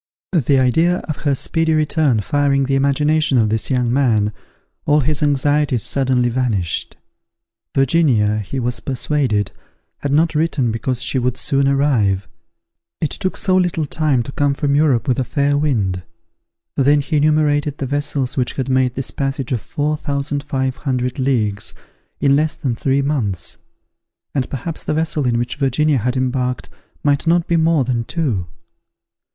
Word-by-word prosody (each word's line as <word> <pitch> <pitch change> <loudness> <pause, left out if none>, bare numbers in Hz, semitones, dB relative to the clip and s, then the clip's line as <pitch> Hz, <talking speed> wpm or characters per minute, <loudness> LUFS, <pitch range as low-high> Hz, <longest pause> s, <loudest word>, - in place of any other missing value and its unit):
The 145 -6 +2
idea 160 +8 +3
of 155 - -3
her 145 -2 0
speedy 160 +4 +1
return 150 -6 +1
firing 140 +4 +1
the 135 - -1
imagination 140 +1 +2
of 110 -3 +3
this 110 0 -1
young 125 -2 +1
man, 110 -6 +2 0.5
all 150 +1 +4
his 150 +3 0
anxieties 145 -3 +2
suddenly 130 -3 +1
vanished. 115 -9 -2 0.8
Virginia, 130 -7 +2
he 110 +6 -4
was 125 0 -2
persuaded, 130 -6 -1 0.5
had 140 - -3
not 160 +3 +3
written, 150 -6 0
because 120 +2 -2
she 130 - +3
would 125 0 -1
soon 135 +1 +1
arrive. 125 -9 +1 0.7
It 155 - -1
took 185 - -3
so 185 - +2
little 175 -4 +1
time 145 -4 0
to 135 - -8
come 140 0 0
from 140 0 0
Europe 145 -4 +2
with 125 -2 +1
a - - +2
fair 140 +2 0
wind! 110 -11 0 0.7
Then 145 +1 +3
he 150 +2 -1
enumerated 150 -1 +2
the 135 - -3
vessels 140 -1 -2
which 125 -2 -1
had 135 -1 -3
made 130 -1 +1
this 135 -1 -2
passage 135 -2 -3
of 120 -4 0
four 150 -1 -2
thousand 140 -1 -2
five 130 -2 -2
hundred 125 -2 -2
leagues 115 -6 0 0.4
in 140 -1 +3
less 155 +1 +1
than 125 -4 -2
three 135 +3 0
months; 120 - -2 0.8
and 130 -3 -1
perhaps 155 +5 -5
the 150 - -1
vessel 155 -3 0
in 120 -1 +1
which 120 +2 -2
Virginia 140 +1 +1
had 125 +4 -1
embarked 125 0 -1 0.3
might 145 +2 +1
not 170 0 +3
be 170 - +1
more 160 -3 +3
than 120 -2 -1
two. 120 - -2
135 Hz, 160 wpm, -19 LUFS, 125-150 Hz, 0.8 s, all